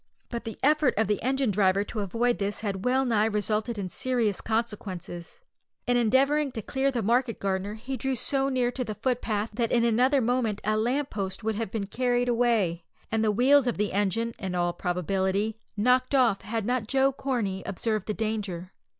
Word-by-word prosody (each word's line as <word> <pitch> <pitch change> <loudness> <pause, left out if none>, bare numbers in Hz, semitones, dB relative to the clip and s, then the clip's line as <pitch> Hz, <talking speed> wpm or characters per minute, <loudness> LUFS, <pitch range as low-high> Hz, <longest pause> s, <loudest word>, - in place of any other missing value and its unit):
But 235 -1 -5
the 225 - -6
effort 300 -1 +3
of 220 - +3
the 205 +1 -1
engine 265 -2 +1
driver 195 0 +3
to 215 +2 -6
avoid 230 +5 0
this 205 +1 -2
had 200 -2 -3
well 260 +2 +2
nigh 220 -4 +2
resulted 215 +1 -1
in 190 -3 -4
serious 235 -6 0
consequences. 205 - -4 0.4
In 245 - +2
endeavouring 270 +5 +3
to 220 -4 -5
clear 270 +5 0
the 245 -4 -2
market 235 +2 +1
gardener 195 +1 -2
he 255 +4 -5
drew 265 0 -1
so 270 +3 +1
near 250 -2 +1
to 250 +1 -3
the 215 -3 -5
footpath 225 -2 -1
that 230 +1 -1
in 235 -1 +3
another 250 +5 +3
moment 235 -3 0
a 215 +1 +1
lamp 255 +6 0
post 195 0 -4
would 220 0 0
have 220 -1 -3
been 205 -1 -3
carried 245 +3 0
away, 225 -8 +1 0.3
and 225 0 +1
the 220 - +3
wheels 255 +5 +4
of 240 - 0
the 210 -1 -1
engine, 205 +4 0
in 190 -3 -3
all 175 0 +1
probability, 190 +4 -1 0.2
knocked 255 +5 +3
off, 240 -7 +3
had 225 -1 -3
not 245 -2 -1
Joe 270 +2 +3
Corney 235 -8 -2
observed 215 +1 -2
the 210 - -2
danger. 200 -5 -3
225 Hz, 195 wpm, -27 LUFS, 205-250 Hz, 0.4 s, wheels